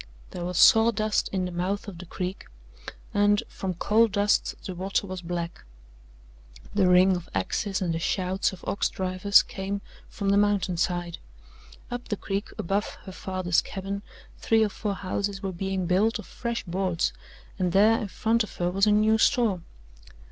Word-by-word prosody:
There 175 Hz, -, -5 dB
was 180 Hz, -1 st, -3 dB
sawdust 220 Hz, 0 st, +5 dB
in 190 Hz, -2 st, -1 dB
the 180 Hz, -, -4 dB
mouth 185 Hz, +4 st, -2 dB
of 185 Hz, -4 st, -8 dB
the 180 Hz, -, -9 dB
creek 185 Hz, +2 st, -5 dB, 0.7 s
and, 205 Hz, +2 st, +3 dB
from 185 Hz, -2 st, -4 dB
coal 220 Hz, +6 st, +3 dB
dust, 205 Hz, 0 st, +1 dB
the 185 Hz, -, -4 dB
water 190 Hz, +3 st, -1 dB
was 185 Hz, -2 st, -6 dB
black. 170 Hz, -, -5 dB, 1.1 s
The 200 Hz, -2 st, +3 dB
ring 180 Hz, +1 st, +5 dB
of 175 Hz, -1 st, -7 dB
axes 185 Hz, -, -1 dB
and 170 Hz, -2 st, 0 dB
the 165 Hz, -, -2 dB
shouts 185 Hz, +2 st, 0 dB
of 190 Hz, -, -12 dB
ox 200 Hz, -, 0 dB
drivers 185 Hz, +2 st, +3 dB
came 195 Hz, +1 st, -4 dB, 0.3 s
from 200 Hz, -1 st, -3 dB
the 200 Hz, -, +4 dB
mountain 200 Hz, -3 st, +2 dB
side. 175 Hz, 0 st, -1 dB, 0.7 s
Up 245 Hz, 0 st, -5 dB
the 210 Hz, -, -2 dB
creek 200 Hz, +1 st, -3 dB
above 200 Hz, +4 st, -2 dB
her 190 Hz, -, -8 dB
father's 185 Hz, -2 st, 0 dB
cabin 195 Hz, +1 st, -5 dB, 0.4 s
three 225 Hz, -1 st, +3 dB
or 215 Hz, -, +1 dB
four 205 Hz, 0 st, -3 dB
houses 195 Hz, +1 st, -3 dB
were 195 Hz, -, -2 dB
being 190 Hz, +1 st, -2 dB
built 200 Hz, +6 st, +2 dB
of -, -, -9 dB
fresh 235 Hz, -1 st, -4 dB
boards, 180 Hz, -2 st, -1 dB, 0.5 s
and 180 Hz, -2 st, +1 dB
there 215 Hz, +5 st, +5 dB
in 210 Hz, -, -3 dB
front 225 Hz, +4 st, +1 dB
of 215 Hz, -, -9 dB
her 175 Hz, 0 st, -1 dB
was 195 Hz, +3 st, +2 dB
a -, -, +5 dB
new 215 Hz, +1 st, +4 dB
store. 220 Hz, -8 st, +3 dB
195 Hz, 175 wpm, -26 LUFS, 180-205 Hz, 1.1 s, sawdust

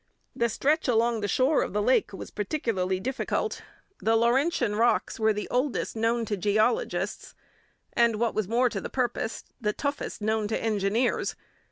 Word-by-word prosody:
The 235 Hz, 0 st, +1 dB
stretch 295 Hz, +8 st, +1 dB
along 230 Hz, -1 st, +2 dB
the 205 Hz, -, -1 dB
shore 260 Hz, +9 st, +3 dB
of -, -, -3 dB
the 210 Hz, -, +1 dB
lake 255 Hz, +4 st, +3 dB
was 195 Hz, -, -8 dB
particularly 195 Hz, -5 st, -1 dB
difficult. 265 Hz, -, -2 dB, 0.4 s
The 225 Hz, +1 st, +2 dB
Laurentian 240 Hz, 0 st, +2 dB
rocks 230 Hz, +1 st, +1 dB
were 220 Hz, 0 st, +4 dB
the 210 Hz, -1 st, -3 dB
oldest 255 Hz, 0 st, 0 dB
known 230 Hz, +1 st, +1 dB
to 210 Hz, -, -1 dB
geologists, 215 Hz, -, 0 dB, 0.6 s
and, 235 Hz, -1 st, +3 dB
what 230 Hz, +1 st, 0 dB
was 215 Hz, -3 st, -1 dB
more 240 Hz, +4 st, +3 dB
to -, -, -3 dB
the -, -, -5 dB
purpose, 245 Hz, -3 st, -2 dB, 0.2 s
the 210 Hz, -1 st, 0 dB
toughest 285 Hz, +3 st, -3 dB
known 215 Hz, 0 st, 0 dB
to 220 Hz, -, -1 dB
engineers. 220 Hz, +2 st, 0 dB
230 Hz, 165 wpm, -27 LUFS, 210-250 Hz, 0.6 s, were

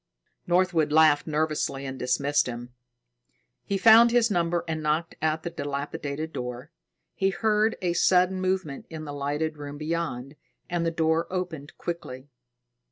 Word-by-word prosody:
Northwood 175 Hz, -4 st, +2 dB
laughed 155 Hz, -1 st, +5 dB
nervously 150 Hz, -3 st, -1 dB
and 130 Hz, -1 st, -6 dB
dismissed 140 Hz, +3 st, +1 dB
him. 120 Hz, 0 st, -7 dB, 0.9 s
He 200 Hz, -, -1 dB
found 225 Hz, +3 st, +7 dB
his 235 Hz, -1 st, +3 dB
number 170 Hz, -2 st, +1 dB
and 160 Hz, -1 st, -3 dB
knocked 155 Hz, +2 st, -1 dB
at 160 Hz, 0 st, 0 dB
the 170 Hz, -, -4 dB
dilapidated 145 Hz, +1 st, -4 dB
door. 125 Hz, +4 st, -6 dB, 0.4 s
He 195 Hz, -, +1 dB
heard 215 Hz, +3 st, +1 dB
a 175 Hz, -1 st, +1 dB
sudden 185 Hz, +1 st, +3 dB
movement 185 Hz, -6 st, -2 dB
in 160 Hz, -1 st, -7 dB
the 145 Hz, -, -6 dB
lighted 145 Hz, +2 st, -2 dB
room 145 Hz, 0 st, -7 dB
beyond, 150 Hz, -4 st, -4 dB, 0.3 s
and 175 Hz, -1 st, -1 dB
the 165 Hz, -, +1 dB
door 160 Hz, 0 st, +1 dB
opened 180 Hz, -6 st, -5 dB
quickly. 145 Hz, -6 st, -6 dB
160 Hz, 145 wpm, -26 LUFS, 145-175 Hz, 0.9 s, found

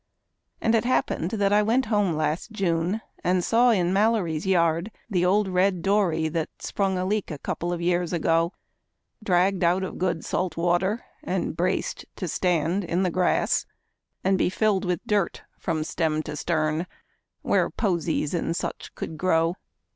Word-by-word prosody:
And 225 Hz, -, +2 dB
it 225 Hz, -, +3 dB
happened 240 Hz, -8 st, 0 dB
that 200 Hz, -1 st, +1 dB
I 210 Hz, -, +5 dB
went 235 Hz, +5 st, +2 dB
home 205 Hz, -5 st, +1 dB
last 155 Hz, +6 st, -1 dB
June, 185 Hz, 0 st, 0 dB, 0.2 s
and 180 Hz, 0 st, +2 dB
saw 240 Hz, +5 st, +4 dB
in 185 Hz, -5 st, +2 dB
Mallory's 195 Hz, -6 st, +1 dB
yard 170 Hz, 0 st, +2 dB, 0.2 s
The 180 Hz, -3 st, +2 dB
old 195 Hz, +3 st, +3 dB
red 185 Hz, -1 st, +1 dB
dory 185 Hz, -6 st, +2 dB
that 160 Hz, 0 st, -2 dB
sprung 195 Hz, -2 st, -1 dB
a 180 Hz, -, -1 dB
leak 205 Hz, +1 st, -1 dB
a 150 Hz, -, -5 dB
couple 175 Hz, +4 st, -3 dB
of 175 Hz, -1 st, -3 dB
years 175 Hz, 0 st, +1 dB
ago, 165 Hz, 0 st, +2 dB, 0.7 s
Dragged 185 Hz, -1 st, +2 dB
out 180 Hz, +3 st, +3 dB
of 190 Hz, -, -5 dB
good 175 Hz, -3 st, -1 dB
salt 185 Hz, -2 st, -2 dB
water 175 Hz, +6 st, +1 dB, 0.2 s
and -, -, -2 dB
braced -, -, -1 dB
to -, -, -4 dB
stand 180 Hz, +1 st, +1 dB
in 175 Hz, +2 st, 0 dB
the 180 Hz, -, +1 dB
grass 180 Hz, +1 st, +1 dB, 0.6 s
And 190 Hz, 0 st, +2 dB
be -, -, +3 dB
filled 200 Hz, 0 st, +1 dB
with 180 Hz, -2 st, -2 dB
dirt 205 Hz, -4 st, 0 dB, 0.2 s
from 160 Hz, -3 st, -1 dB
stem 155 Hz, -1 st, -1 dB
to 155 Hz, -1 st, -6 dB
stern, 155 Hz, +1 st, 0 dB, 0.6 s
where -, -, +2 dB
posies 170 Hz, -7 st, -1 dB
and 165 Hz, -1 st, -1 dB
such -, -, -5 dB
could 155 Hz, -, -6 dB
grow. 165 Hz, -1 st, +2 dB
180 Hz, 165 wpm, -25 LUFS, 165-200 Hz, 0.7 s, I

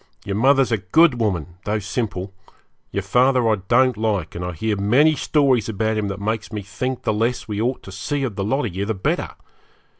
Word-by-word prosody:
Your 100 Hz, -, -2 dB
mother's 135 Hz, +3 st, +3 dB
a 110 Hz, -, +1 dB
good 125 Hz, -, +3 dB
woman, 90 Hz, -6 st, -2 dB
though 105 Hz, +1 st, -1 dB
simple; 100 Hz, -2 st, -3 dB, 0.6 s
your 100 Hz, -, -3 dB
father 125 Hz, +3 st, +3 dB
I 110 Hz, -1 st, +3 dB
don't 130 Hz, 0 st, +4 dB
like, 105 Hz, -7 st, -1 dB
and 90 Hz, -, -5 dB
I 90 Hz, 0 st, -4 dB
hear 105 Hz, +6 st, -1 dB
many 125 Hz, +11 st, +4 dB
stories 135 Hz, -8 st, +2 dB
about 110 Hz, +1 st, -1 dB
him 105 Hz, -1 st, -1 dB
that 100 Hz, 0 st, -4 dB
makes 110 Hz, +1 st, -3 dB
me 105 Hz, -2 st, -4 dB
think 130 Hz, +6 st, -4 dB
the -, -, +1 dB
less 115 Hz, +3 st, -1 dB
we 105 Hz, -1 st, -3 dB
ought 125 Hz, +3 st, -1 dB
to 95 Hz, -, -10 dB
see 135 Hz, +10 st, -3 dB
of 120 Hz, -7 st, -3 dB
the 100 Hz, -, -2 dB
lot 130 Hz, +7 st, 0 dB
of 95 Hz, -6 st, -5 dB
you 95 Hz, -, -1 dB
the 110 Hz, +1 st, -2 dB
better. 95 Hz, -, -1 dB
110 Hz, 215 wpm, -21 LUFS, 100-125 Hz, 0.6 s, don't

